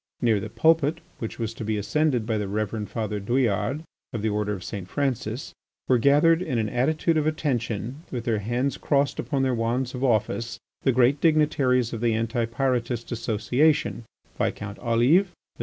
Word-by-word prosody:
Near 115 -4 +2
the - - -6
pulpit, 160 -1 +2 0.2
which 115 - -5
was 115 -1 -3
to 115 - -7
be 110 0 -1
ascended 125 +2 +1
by 110 -1 0
the 105 - -2
Reverend 105 +1 -3
Father 105 -2 -3
Douillard, 125 +6 0 0.3
of 110 -3 -3
the 110 - +2
Order 105 0 -1
of 95 -3 -6
St. 100 -4 -6
Francis, 125 -1 -2 0.3
were 125 -2 +4
gathered, 150 +6 +4
in 130 -9 -2
an 110 -2 0
attitude 155 +7 +1
of 155 0 +1
attention 125 -6 -2
with 120 -3 -4
their 115 -4 +1
hands 120 +6 -1
crossed 140 -1 +1
upon 140 -3 -1
their 130 -1 +1
wands 120 +2 -1
of 130 0 -4
office, 115 -1 0 0.2
the 135 - +3
great 130 +3 +3
dignitaries 145 -7 +3
of 115 - -4
the 115 -2 +2
Anti 115 +1 0
Pyrotist 120 -1 -1
association, 125 +6 +1 0.4
Viscount 105 -1 -2
Olive, 125 +11 +3
M. 175 - -26
120 Hz, 175 wpm, -25 LUFS, 110-140 Hz, 0.4 s, were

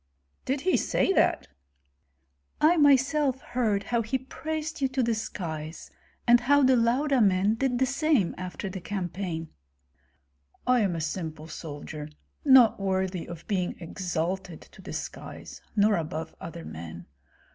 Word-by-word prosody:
"Did 265 +1 -1
he 370 +4 +3
say 390 - +1
that?" - - +2 1.1
"I 320 +3 +5
myself 280 -2 +4
heard 220 -5 0
how 235 +2 0
he 230 +4 -1
praised 310 +4 -5
you 270 - +3
to 260 0 0
the 230 0 +2
skies, 160 -7 -5 0.3
and 240 0 +7
how 285 +4 +4
the 260 0 +5
Lauda 250 +3 +2
men 195 0 +4
did 250 +1 0
the 260 - +3
same 275 - +2
after 185 +2 -5
the 190 -1 -6
campaign." 180 -4 -4 1.2
"I 250 0 +4
am 195 -6 +1
a 165 - -3
simple 160 -1 -4
soldier, 155 -1 -7 0.3
not 260 -7 +7
worthy 190 -2 -1
of 170 -1 -9
being 185 -4 -1
exalted 180 0 -3
to - - -16
the - - -8
skies, - - -7
nor 210 -1 +4
above 160 0 -4
other 165 0 -7
men. 85 +1 -8
205 Hz, 145 wpm, -27 LUFS, 170-260 Hz, 1.2 s, and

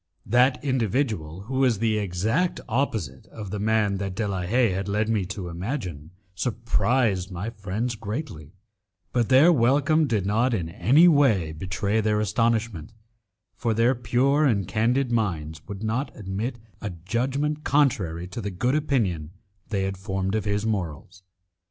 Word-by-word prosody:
That 125 +5 +3
individual, 110 - -1
who 130 +6 -3
was 125 -5 +3
the 110 0 +1
exact 105 - 0
opposite 110 - -2
of 105 -4 -8
the 105 - -3
man 105 -1 +1
that 95 -1 -4
De 110 0 -1
la 95 -2 -2
Haye 115 +5 +2
had 95 +2 -3
led 105 +2 0
me 110 -4 0
to 100 -2 -5
imagine, 85 - -5 0.2
surprised 115 -1 0
my 95 +5 -4
friends 110 +3 -3
greatly, 105 - -6 0.6
but 120 -3 +1
their 140 +7 +7
welcome 145 +4 +3
did 105 -6 0
not 115 +5 +2
in 85 -5 -3
any 130 - +5
way 125 - +4
betray 95 +6 -1
their 105 0 +1
astonishment, 110 -4 0 0.6
for 115 -2 -1
their 115 +3 +4
pure 135 +4 +2
and 105 - +2
candid 120 +6 +1
minds 80 -9 -1
would 100 +1 -7
not 115 +6 -1
admit 105 +5 -4 0.2
a 105 - -3
judgment 130 - -2
contrary 95 - +1
to 115 - -5
the 100 - -3
good 120 +8 0
opinion 110 - 0 0.4
they 100 -3 0
had 95 0 -3
formed 95 0 -2
of 110 -1 -1
his 105 +1 0
morals. 95 -3 -4
110 Hz, 155 wpm, -25 LUFS, 95-125 Hz, 0.6 s, their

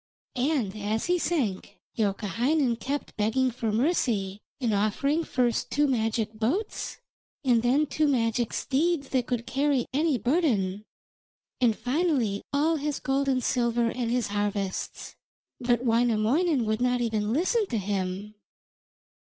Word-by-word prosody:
And 250 -6 0
as 215 +1 -2
he 355 0 +2
sank, 255 - -1 0.2
Youkahainen 230 +6 +1
kept 280 +4 -4
begging 245 +5 +1
for 225 -2 -2
mercy, 215 - 0 0.2
and 235 -5 0
offering 245 +10 +1
first 245 -6 0
two 295 +1 +2
magic 225 -4 0
boats, 265 - -2 0.5
and 240 -3 +4
then 260 +6 +3
two 300 +2 0
magic 235 -3 +1
steeds 290 +1 0
that 255 -3 0
could 240 -2 -2
carry 275 -1 +1
any 300 -1 +2
burden, 225 - 0 0.7
and 235 -4 +3
finally 255 - 0
all 310 +3 +2
his 295 0 -2
gold 275 0 0
and 255 -2 +1
silver 235 -1 +1
and 245 -2 -2
his 240 -3 0
harvests, 205 -2 -3 0.4
but 240 0 +1
Wainamoinen 240 +5 +2
would 215 +2 -1
not 250 0 +2
even 220 -3 0
listen 380 - +1
to 230 - -2
him. 195 0 -3
245 Hz, 135 wpm, -27 LUFS, 215-280 Hz, 0.7 s, and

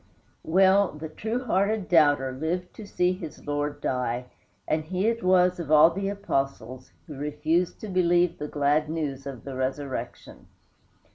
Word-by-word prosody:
Well, 190 +2 +4
the 155 +1 -7
true 225 +10 -3
hearted 205 -2 0
doubter 145 -5 +4
lived 165 +7 -3
to 215 - -10
see 180 -2 +1
his 175 -5 -9
Lord 145 0 -2
die, 125 -1 -2 0.4
and 155 0 0
he 185 +5 -2
it 230 +1 +1
was, 180 -1 +3
of 165 -4 -5
all 155 +2 +7
the 195 +3 -3
disciples, 135 - -3
who 150 - -9
refused 150 +5 -1
to 215 - -6
believe 175 -2 +2
the 150 - -4
glad 150 +1 +1
news 140 -4 -4
of 130 -5 -8
the 135 - -7
resurrection. 130 +1 -5
160 Hz, 155 wpm, -26 LUFS, 145-185 Hz, 0.4 s, all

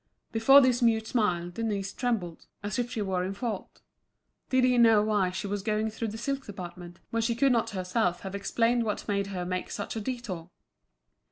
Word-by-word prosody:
Before 270 +5 +7
this 255 -1 +3
mute 225 -2 +3
smile, 180 -7 0
Denise 200 -1 -2
trembled, 215 -10 -2 0.2
as 205 +3 -2
if 245 0 -1
she 230 -4 -2
were 185 -2 -1
in 190 +2 -3
fault. 215 -2 -5 0.7
Did 260 -1 +3
he 250 -1 +4
know 225 -3 +6
why 210 -4 +2
she 180 +2 -4
was 200 0 -2
going 215 +1 0
through 225 +1 -3
the 215 +1 -5
silk 275 +4 -2
department, 175 -3 -9
when 230 - 0
she 230 +1 0
could 275 +3 +3
not 235 -2 +2
herself 185 -1 -1
have 195 -1 -6
explained 230 +4 +1
what 210 -2 -3
made 200 -1 0
her 185 -3 -4
make 185 0 -3
such 205 - -5
a 220 - -2
détour. 205 -8 -5
215 Hz, 195 wpm, -28 LUFS, 190-235 Hz, 0.7 s, Before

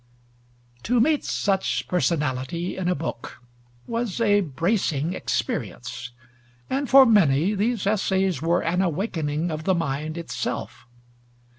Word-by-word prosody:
To 245 - +1
meet 295 +5 +3
such 195 -2 -1
personality 150 0 -1
in 185 -2 -3
a 180 - +2
book 140 -5 -6 0.5
was 230 -3 -3
a 205 -3 +4
bracing 165 -1 0
experience; 125 - -3 0.6
and 275 0 -1
for 270 0 +9
many 185 - +4
these 215 +1 0
essays 190 -5 +1
were 170 +2 +1
an 180 +3 +1
awakening 165 -3 -1
of 155 0 -5
the 190 - +3
mind 155 0 -2
itself. 170 -6 -5
175 Hz, 120 wpm, -24 LUFS, 150-205 Hz, 0.6 s, for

